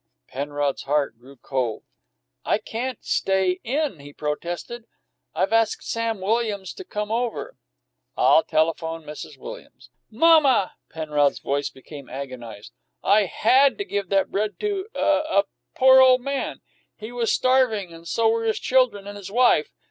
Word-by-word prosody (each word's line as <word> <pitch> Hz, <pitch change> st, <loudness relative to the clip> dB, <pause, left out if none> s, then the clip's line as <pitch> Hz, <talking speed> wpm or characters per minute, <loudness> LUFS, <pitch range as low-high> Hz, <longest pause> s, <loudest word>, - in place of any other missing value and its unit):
Penrod's 145 Hz, 0 st, -2 dB
heart 140 Hz, -5 st, -1 dB
grew 135 Hz, +3 st, -15 dB
cold. 125 Hz, -4 st, -3 dB, 0.6 s
"I -, -, +1 dB
can't 235 Hz, +3 st, -4 dB
stay 190 Hz, -1 st, +1 dB
in," 275 Hz, -, -1 dB
he 145 Hz, +1 st, -11 dB
protested. 175 Hz, +11 st, -5 dB, 0.5 s
"I've -, -, 0 dB
asked 225 Hz, -1 st, +2 dB
Sam 230 Hz, -3 st, -2 dB
Williams 205 Hz, -2 st, -1 dB
to 380 Hz, -, -9 dB
come 210 Hz, -, -4 dB
over." 245 Hz, -, -2 dB, 0.6 s
"I'll -, -, +5 dB
telephone 165 Hz, 0 st, -1 dB
Mrs. 150 Hz, 0 st, -9 dB
Williams." -, -, -11 dB, 0.2 s
"Mamma!" 270 Hz, -, +4 dB, 0.2 s
Penrod's 150 Hz, -3 st, 0 dB
voice 140 Hz, +1 st, -2 dB
became 140 Hz, +1 st, -12 dB
agonized. 125 Hz, -6 st, -8 dB, 0.3 s
"I 205 Hz, +1 st, +4 dB
had 265 Hz, +8 st, +3 dB
to 405 Hz, -, -3 dB
give 200 Hz, -, -3 dB
that 195 Hz, -1 st, +1 dB
bread 210 Hz, +1 st, -2 dB
to 405 Hz, -2 st, -2 dB
a -, -, -6 dB
to 300 Hz, 0 st, +2 dB
a 200 Hz, -, +3 dB, 0.3 s
poor 260 Hz, 0 st, +7 dB
ole 255 Hz, -1 st, +7 dB
man. 275 Hz, +2 st, -4 dB, 0.4 s
He 215 Hz, +2 st, -8 dB
was 240 Hz, -2 st, 0 dB
starving 245 Hz, -8 st, +2 dB
and 165 Hz, 0 st, -12 dB
so 230 Hz, +5 st, +1 dB
were 225 Hz, 0 st, +1 dB
his 220 Hz, -, +1 dB
children 250 Hz, -6 st, +2 dB
and 205 Hz, 0 st, -8 dB
his 200 Hz, -1 st, -9 dB
wife. 240 Hz, -9 st, +3 dB
205 Hz, 150 wpm, -23 LUFS, 155-250 Hz, 0.6 s, poor